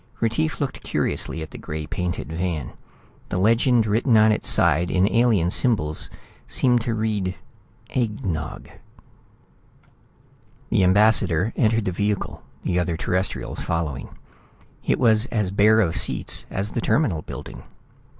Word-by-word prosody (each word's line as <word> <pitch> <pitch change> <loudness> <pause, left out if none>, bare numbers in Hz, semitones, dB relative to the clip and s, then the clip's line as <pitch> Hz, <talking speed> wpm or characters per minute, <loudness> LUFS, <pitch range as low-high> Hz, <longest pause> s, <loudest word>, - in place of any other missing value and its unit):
Retief 115 -9 0
looked - - -3
curiously 80 - -2
at 80 - -10
the - - -9
gray 75 0 -5
painted 85 -1 -4
van. 85 -5 -3 0.6
The - - -2
legend 115 +4 +3
written 110 +3 +3
on 110 0 +6
its 105 - 0
side 85 +4 +3
in 95 +1 +3
alien 110 -7 +2
symbols 85 - 0 0.4
seemed 125 -2 +2
to 115 0 -2
read 105 -4 -1 0.6
"egg 110 -5 -2
nog." 80 -4 -4 2.0
The 95 - +3
ambassador 100 -1 +3
entered 115 -2 +2
the 95 - 0
vehicle, 100 +2 -2 0.2
the 90 -1 0
other 85 -2 -1
Terrestrials 90 +3 -2
following. 80 -5 -3 0.7
It - - +1
was 110 -1 +3
as 105 -6 -1
bare 105 +2 +4
of 85 -6 0
seats - - 0
as 100 +2 -3
the 120 - -2
Terminal 110 - +1
building. - - -9
100 Hz, 135 wpm, -23 LUFS, 85-110 Hz, 2.0 s, on